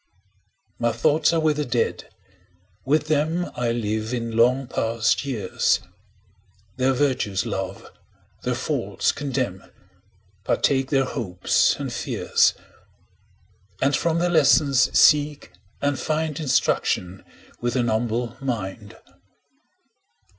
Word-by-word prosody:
My 120 0 +1
thoughts 120 +7 +2
are 165 - +1
with 155 -2 +1
the 150 - 0
Dead; 120 -9 -2 0.8
with 150 +3 +2
them 160 +4 0
I 120 -1 -1
live 110 0 -2
in 115 -1 -4
long 125 +4 +3
past 115 -3 0
years, 110 -9 0 1.0
Their 130 +1 +2
virtues 125 -9 0
love, 95 0 -4 0.6
their - - -1
faults - - -1
condemn, 130 -9 -3
15 - - -22 0.7
Partake 135 -1 +1
their 135 -2 +2
hopes 95 -9 +1
and - - -5
fears; - - +1 1.2
And 140 +1 +2
from 165 -1 0
their 175 +1 +1
lessons 145 -4 +4
seek 150 - +4 0.3
and 145 -1 0
find 155 -1 -2
Instruction 95 - 0 0.4
with 120 0 -2
an 120 -2 +1
humble 115 +1 -1
mind. 110 -4 -5
125 Hz, 110 wpm, -23 LUFS, 115-145 Hz, 1.2 s, lessons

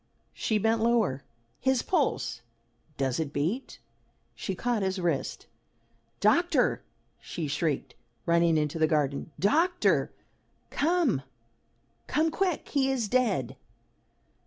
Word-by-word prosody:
She 220 - 0
bent 225 +2 +1
lower. 225 - +2 0.4
"His 265 -2 +1
pulse! 135 - 0 0.6
does 130 -1 0
it 155 -3 -2
beat?" 170 - -2 0.6
she 190 - -4
caught 235 +3 -1
his 190 0 -1
wrist. 170 -6 -2 0.7
"Doctor!" 340 - +3 0.4
she 165 -3 -5
shrieked, 145 0 -1 0.3
running 170 -1 +3
into 150 +1 -1
the 155 - +4
garden. 145 -3 0
"Doctor! 335 - +2 0.6
Come 310 - +2 0.9
come 315 +1 +1
quick! 365 -1 -1
He 270 -2 +2
is 255 -5 0
dead!" 205 - +1
205 Hz, 110 wpm, -28 LUFS, -, 0.9 s, the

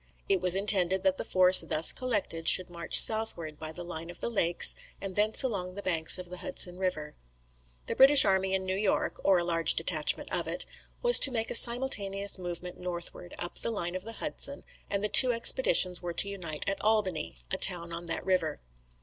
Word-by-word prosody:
It 190 -2 -2
was 180 0 0
intended 190 -2 0
that 190 -1 -2
the - - -6
force 185 0 +5
thus 165 -1 -2
collected 205 -10 -4
should 185 -1 +3
march 170 -1 +3
southward 175 -9 +2
by 155 0 -10
the 175 +2 -10
line 165 -1 -8
of 175 - -12
the - - -6
lakes, 175 -6 +4 0.3
and 195 -2 -10
thence 210 +4 +1
along 185 -7 -6
the 200 - -10
banks 165 -2 +3
of 180 -1 -12
the 180 - -9
Hudson 180 -8 -2
river. 155 -5 -6 0.7
The - - -7
British 275 0 +6
army 190 -1 -2
in 190 0 -6
New 185 0 -5
York 200 0 -4
(or 195 -2 +1
a 175 - -3
large 165 -1 +2
detachment - - -2
of - - -6
it) - - -5 0.4
was 485 0 +6
to - - +4
make 225 -2 -4
a - - -4
simultaneous 200 -6 +3
movement 180 0 -9
northward, 175 0 -9
up 175 - -6
the - - -5
line 175 -6 -6
of 185 0 -8
the 225 +2 -11
Hudson, - - -5 0.3
and 200 0 -5
the - - -1
two 250 +4 +6
expeditions 230 - +2
were 175 -1 -8
to 200 - +5
unite 170 -6 -8
at 195 0 -5
Albany, 195 - -3 0.2
a - - -4
town 170 -2 -1
on 170 +1 -9
that 165 - -6
river. 180 -5 -4
185 Hz, 205 wpm, -26 LUFS, 175-205 Hz, 0.7 s, British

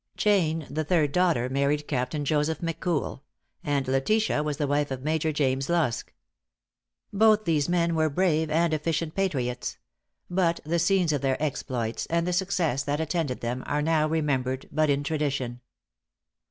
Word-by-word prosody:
Jane, 165 -7 +2
the 155 +4 -2
third 155 -3 +2
daughter, 170 -8 +2
married 140 +3 0
Captain 135 +2 -2
Joseph 150 +2 +1
McCool; 165 -4 -2 0.4
and 145 -4 0
Letitia 150 +8 +1
was 150 -2 -2
the 150 - 0
wife 145 +1 0
of 130 -1 -5
Major 155 +1 0
James 135 -1 0
Lusk. 160 -9 0 1.0
Both 215 +1 +4
these 160 -2 +1
were 170 -2 +2
brave 160 -1 +1
and 165 +1 +2
efficient 155 +1 -1
patriots; 135 -11 -2 0.5
but 175 -2 +1
the 170 +3 0
scenes 175 -2 +2
of 145 - -1
their 135 -1 0
exploits, 125 -6 -2
and 170 0 0
the 180 - -1
success 180 -7 0
that 145 +2 -2
attended 160 -4 -2
them, 120 +2 -2
are 150 0 0
now 155 -1 +2
remembered 135 -5 -1
but 155 0 +2
in 140 0 +1
tradition. 140 -5 -2
155 Hz, 155 wpm, -26 LUFS, 140-170 Hz, 1.0 s, Both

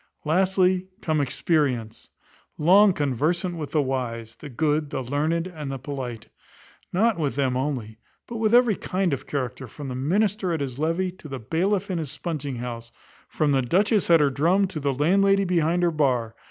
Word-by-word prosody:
Lastly, 185 +2 +2
come 155 -2 0
Experience, 130 -5 -1 0.5
long 195 +6 +6
conversant 160 +4 -1
with 155 -3 -5
the 150 -2 +1
wise, 115 -4 -4
the 150 - -9
good, 150 +2 0
the 135 - -3
learned, 155 +6 0
and 155 -6 -6
the 135 - -3
polite. 130 -4 -6 0.6
Nor 225 +6 +3
with 145 -6 -1
them 135 -3 0
only, 125 -5 -3 0.3
but 235 - -6
with 220 -1 +1
every 240 -4 +5
kind 185 -3 -1
of 135 - -5
character, 130 -2 -4
from 135 +5 -8
the 125 - -4
minister 190 +6 0
at 160 - -1
his 135 -2 -4
levee, 165 +4 0
to 175 -3 -13
the 135 -2 -5
bailiff 180 - -1
in 175 - -1
his 155 -4 -4
spunging 145 -4 -4
house; 120 -1 -6 0.4
from 150 -2 0
the 135 -1 +3
dutchess 195 - +2
at 165 -2 +6
her 145 -2 +3
drum, 170 +9 +2
to 160 - -5
the 140 -1 0
landlady 195 +8 +3
behind 175 -1 +1
her 175 - +3
bar. 125 -7 0
150 Hz, 180 wpm, -24 LUFS, 135-180 Hz, 0.6 s, long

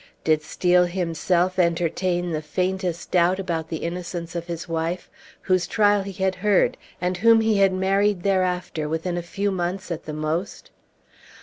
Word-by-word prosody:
Did 155 -1 +3
Steel 180 +3 +2
himself 180 +1 0
entertain 175 +1 +1
the 155 -1 -2
faintest 180 +2 -2
doubt 180 +1 +3
about 165 -4 -3
the 160 - -3
innocence 175 0 -5
of 170 0 -4
his 170 0 -5
wife, 165 +2 -3 0.3
whose 185 -1 +1
trial 205 -2 +3
he 195 0 -6
had 190 -1 +2
heard, 205 -2 +3 0.2
and 180 0 -1
whom 225 +3 +5
he 220 -2 +2
had 195 -1 +5
married 195 0 +1
thereafter 180 -5 0
within 165 +3 -2
a 175 - -2
few 200 +4 -2
months 185 +1 -3
at 170 -1 -4
the 155 - -5
most? 155 +5 -3
180 Hz, 165 wpm, -23 LUFS, 170-190 Hz, 0.3 s, whom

